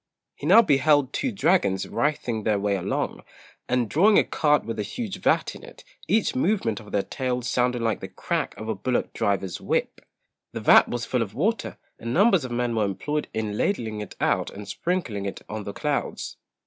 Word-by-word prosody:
He - - -6
now 230 - +8
beheld 145 - +3
two 260 - -1
dragons 170 - +2
writhing 125 -6 -1
their 105 -1 +1
way 100 0 0
along, 95 - -2 0.5
and 125 -2 +1
drawing 200 - +4
a - - +6
cart 150 -1 +1
with 115 -1 -4
a - - +1
huge 195 - -4
vat - - +1
in - - -11
it, - - -13 0.2
each 220 -1 +2
movement 130 - +1
of 105 -2 -13
their 100 - +1
tails 125 -2 -3
sounding 125 -1 +1
like 115 -1 0
the - - -6
crack - - -3
of 110 +1 -7
a 110 - 0
bullock 125 +5 -2
driver's 95 -3 -1
whip. - - -1 0.5
The - - -4
vat - - +6
was 120 -1 -3
full 125 - 0
of 105 -2 -4
water, 215 - -1 0.2
and 115 +1 -3
numbers 195 - +5
of 130 - -5
men 120 0 -1
were 110 -2 +2
employed 150 +10 -2
in 110 -2 -3
ladling 110 - -1
it 105 - -8
out - - +1
and 100 0 -9
sprinkling 105 - -2
it 100 - -6
on 105 -1 -5
the 100 - -4
clouds. 145 +3 -3
120 Hz, 200 wpm, -25 LUFS, 105-150 Hz, 0.5 s, now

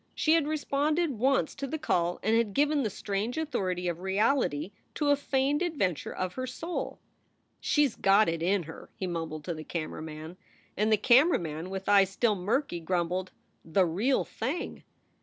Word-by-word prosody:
She 315 - +3
had 325 -3 +3
responded 300 -1 0
once 270 +3 +2
to 275 - -5
the 315 - -3
call 175 - 0
and 220 +2 +3
had 225 -3 +1
given 295 0 +3
the 225 - 0
strange 205 +5 -3
authority 190 - -1
of 170 -1 -2
reality 190 - +1 0.2
to 295 -2 +2
a - - +6
feigned 280 +1 0
adventure 270 - -1
of 185 -1 -3
her 255 0 -4
soul. 330 +7 -4 0.6
"She 295 -1 +3
s 265 - -3
got 200 +2 +4
it 165 -1 -1
in 185 +2 +1
her!" 160 +1 -11
he 190 - -4
mumbled 165 -3 -4
to 170 - -3
the 155 -1 -7
camera 155 -1 -5
man. 160 +2 -8 0.4
And 215 +2 +1
the 215 - +5
camera 260 - +5
man, 160 +1 -5
with 190 0 -5
eyes 200 -2 +5
still 215 +3 +1
murky, 205 +2 -1
grumbled: 180 +2 -1 0.3
"The 185 +3 +2
real 205 +11 +1
thing!" 270 +10 -4
205 Hz, 180 wpm, -29 LUFS, 175-275 Hz, 0.6 s, a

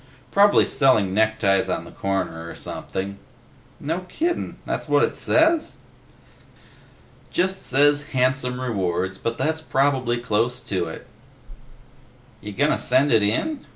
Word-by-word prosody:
Probably 205 +1 +5
selling 110 -9 +2
neckties 105 -2 +2
on - - -2
the - - -12
corner 95 -4 -3
or - - -9
something." 100 +1 -6 0.6
"No 165 +4 -2
kiddin'. 340 +2 -2
That - - -2
what - - +3
it - - 0
says?" 320 0 +2 1.5
"Just 190 +2 -1
says 145 +2 +3
'handsome 130 -2 0
rewards,' 95 -6 -2
but 115 0 -3
that's 160 +1 -1
probably 135 -5 +1
close 120 +1 -1
to 95 -7 -2
it." 80 - -8 1.4
"You 105 - -7
gonna 145 +9 +1
send 130 +3 +2
it 110 -2 +5
in?" 260 - -1
125 Hz, 125 wpm, -23 LUFS, 100-145 Hz, 1.5 s, Probably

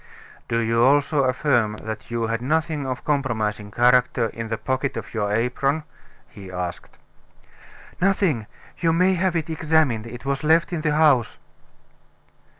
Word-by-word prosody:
"Do 115 - 0
you 115 0 +2
also 140 +1 +3
affirm 120 -5 +1
that 110 0 -7
you 115 -1 -2
had 115 +1 -2
nothing 155 +1 -1
of 130 -1 -2
a - - -18
compromising 110 -8 -1
character 125 +1 +3
in 115 0 -6
the 110 0 -3
pocket 130 +1 -2
of 110 -1 -7
your 105 -2 -1
apron?" 135 +7 0 0.4
he 95 -2 -11
asked. 90 -1 -6 1.0
"Nothing 180 - +1 0.3
you 165 -2 +2
may 185 +3 +3
have 185 0 0
it 165 0 -2
examined; 155 -8 +1
it 120 +3 -10
was 140 +1 -2
left 165 +3 +3
in 165 - -2
the 150 -1 0
house." 145 -7 +3
130 Hz, 150 wpm, -23 LUFS, 115-155 Hz, 1.0 s, also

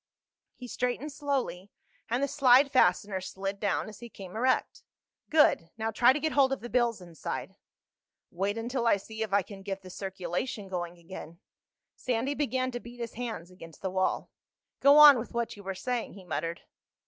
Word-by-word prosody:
He 250 - -9
straightened 250 +5 -2
slowly, 275 -10 -2 0.4
and 240 +4 0
the - - +2
slide 275 0 +5
fastener 205 -7 +3
slid 195 +1 -5
down 205 -1 0
as 215 -1 -10
he 235 - -9
came 190 -3 -10
erect. 260 - +1 0.5
"Good. 295 - +4
Now 225 0 -1
try 240 +3 +5
to 285 - 0
get 315 +1 0
hold 275 -2 +4
of 270 - -2
the 240 - -8
bills 240 -4 +1
inside." 170 -3 -6 0.8
"Wait 200 +4 -1
until 235 +1 -1
I 215 - +5
see 220 +3 -9
if 220 -3 -2
I 200 0 +3
can 195 +1 -11
get 195 0 -5
the 185 - -10
circulation 190 +3 -4
going 175 -1 -4
again." 170 -1 -10 0.6
Sandy 255 +3 -1
began 260 -3 -1
to 245 - -4
beat 240 +1 -12
his 235 -1 -5
hands 220 -7 -5
against 165 -3 -13
the 190 - -1
wall. 185 0 -1 0.5
"Go 280 +1 +7
on 295 -4 +10
with 235 - -7
what 235 -1 -1
you 205 - -11
were 195 -1 -5
saying," 245 +4 -3
he 195 - -12
muttered. 165 0 -3
225 Hz, 185 wpm, -29 LUFS, 190-255 Hz, 0.8 s, on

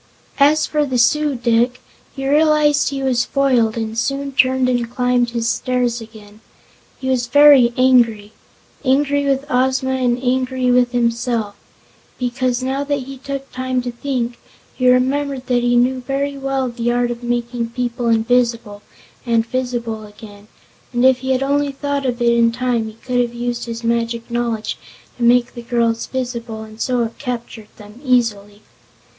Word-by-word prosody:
As 295 +2 +4
for 300 -1 0
the 260 -3 -1
Su 295 +4 +2
dic, 240 +1 +1 0.4
he 270 -1 -4
realized 300 0 +3
he 275 -1 -4
was 250 -3 +1
foiled 250 -5 +1
and 220 -1 -3
soon 275 +4 -2
turned 260 -1 +2
and 245 -2 0
climbed 245 0 +1
his 235 -1 -2
stairs 245 -1 -1
again. 215 -1 -14 0.6
He 260 - -5
was 250 -2 0
very 280 -2 +6
angry 230 -5 +3 0.5
angry 285 +1 +2
with 275 0 0
Ozma 260 0 +1
and 250 -2 +1
angry 255 0 0
with 245 0 +3
himself 235 -3 -1 0.6
because, 250 0 -1
now 265 +2 -1
that 285 -1 -2
he 270 0 -10
took 275 0 -6
time 255 0 -2
to 245 - -4
think, 240 -1 -3 0.3
he 255 -1 +2
remembered 265 +1 +1
that 245 -1 +1
he 245 0 +2
knew 255 +2 +2
very 280 +2 -2
well 270 -1 -2
the 240 0 -2
art 240 0 0
of 240 0 -6
making 240 -1 -2
people 240 0 -3
invisible, 230 -2 +1 0.4
and 230 -2 +1
visible 235 -3 -3
again, 205 0 -14 0.4
and 245 0 +1
if 260 -1 +5
he 260 +1 -5
had 260 0 +1
only 285 +1 0
thought 280 0 -2
of 245 -1 -2
it 235 0 +4
in 230 0 +3
time 240 -2 -1
he 220 - -9
could 250 +2 -2
have 240 0 -3
used 240 0 -3
his 230 0 -6
magic 235 0 -1
knowledge 235 -2 -2 0.4
to - - -12
make 240 0 +3
the 240 - -8
girls 235 -1 0
visible 235 -4 -5
and 220 0 -12
so 250 -2 +1
have 230 0 -5
captured 235 -4 -6
them 210 +4 -14
easily. 215 -5 0
245 Hz, 165 wpm, -19 LUFS, 235-260 Hz, 0.6 s, very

